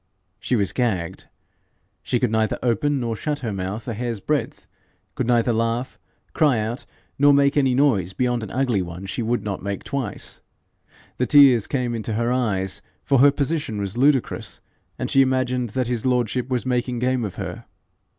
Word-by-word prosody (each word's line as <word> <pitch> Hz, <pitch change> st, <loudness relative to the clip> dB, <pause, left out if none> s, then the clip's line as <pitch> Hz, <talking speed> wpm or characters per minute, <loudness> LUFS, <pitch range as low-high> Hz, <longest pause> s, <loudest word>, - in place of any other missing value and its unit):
She 125 Hz, -, 0 dB
was 100 Hz, -4 st, +1 dB
gagged. 95 Hz, -8 st, -1 dB, 0.8 s
She 120 Hz, -, -1 dB
could 125 Hz, -3 st, +1 dB
neither 110 Hz, -1 st, +1 dB
open 135 Hz, +4 st, +1 dB
nor 115 Hz, -2 st, -2 dB
shut 150 Hz, +6 st, -2 dB
her 115 Hz, -5 st, -3 dB
mouth 95 Hz, +4 st, -4 dB
a 120 Hz, -, -2 dB
hair's 115 Hz, 0 st, -3 dB
breadth, 150 Hz, +8 st, -2 dB, 0.5 s
could -, -, -2 dB
neither 120 Hz, -1 st, +3 dB
laugh, 115 Hz, +3 st, -1 dB, 0.3 s
cry 150 Hz, -6 st, +3 dB
out, 110 Hz, +3 st, -3 dB, 0.3 s
nor 145 Hz, +1 st, +6 dB
make 140 Hz, 0 st, +3 dB
any 135 Hz, -3 st, +3 dB
noise 115 Hz, -, +2 dB
beyond 120 Hz, +4 st, 0 dB
an 110 Hz, -, -6 dB
ugly 125 Hz, -5 st, 0 dB
one 90 Hz, +2 st, -7 dB
she 95 Hz, -, -3 dB
would 120 Hz, +2 st, -1 dB
not 100 Hz, -3 st, -4 dB
make 100 Hz, 0 st, -4 dB
twice. 140 Hz, -2 st, -4 dB, 0.8 s
The 125 Hz, -, 0 dB
tears 135 Hz, -7 st, +6 dB
came 125 Hz, -3 st, -1 dB
into 115 Hz, -1 st, -3 dB
her 115 Hz, +2 st, 0 dB
eyes, 95 Hz, -7 st, -1 dB, 0.2 s
for 135 Hz, -2 st, +3 dB
her 140 Hz, +3 st, +8 dB
position 145 Hz, -5 st, -1 dB
was 100 Hz, +1 st, -3 dB
ludicrous, 135 Hz, 0 st, +1 dB, 0.4 s
and -, -, -2 dB
she 135 Hz, -, +5 dB
imagined 130 Hz, -2 st, +1 dB
that 130 Hz, -1 st, +1 dB
his 120 Hz, -2 st, -2 dB
lordship 125 Hz, -1 st, 0 dB
was 125 Hz, -1 st, -1 dB
making 125 Hz, -1 st, -1 dB
game 125 Hz, 0 st, 0 dB
of 100 Hz, -4 st, -4 dB
her. -, -, -6 dB
120 Hz, 180 wpm, -23 LUFS, 110-130 Hz, 0.8 s, her